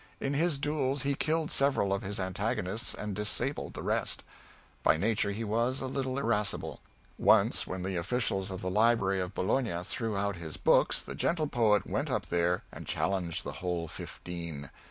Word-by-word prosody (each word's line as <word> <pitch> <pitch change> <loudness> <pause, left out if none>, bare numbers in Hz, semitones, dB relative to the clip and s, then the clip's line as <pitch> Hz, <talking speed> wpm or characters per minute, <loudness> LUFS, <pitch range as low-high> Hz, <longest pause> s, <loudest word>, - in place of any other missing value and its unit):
In 135 - -1
his 160 +1 +2
duels 140 -2 0
he 140 0 +1
killed 155 +2 0
several 135 -8 +3
of 100 - -1
his 100 0 -3
antagonists 95 +3 -1
and 105 -2 -4
disabled 105 +7 -1
the - - -5
rest. - - -1 0.6
By - - +4
nature 105 +3 +1
he 105 +3 -3
was 115 +5 +1
a - - -2
little 130 0 -2
irascible. 115 -6 0 0.4
Once - - +4
when 90 -1 -4
the 95 -1 -2
officials 100 0 0
of 95 -1 -4
the 95 - -2
library 105 -2 +3
of 90 +1 -3
Bologna 105 -3 0
threw 110 +2 -2
out 100 -2 -1
his 80 -3 -6
books - - +3
the - - -7
gentle 165 -2 +1
poet 110 -8 +3
went - - -2
up - - -1
there 85 +1 +1
and - - -9
challenged 90 -4 0
the - - -4
whole 90 -2 -1
fifteen! 85 -5 -6
105 Hz, 175 wpm, -30 LUFS, 90-130 Hz, 0.6 s, By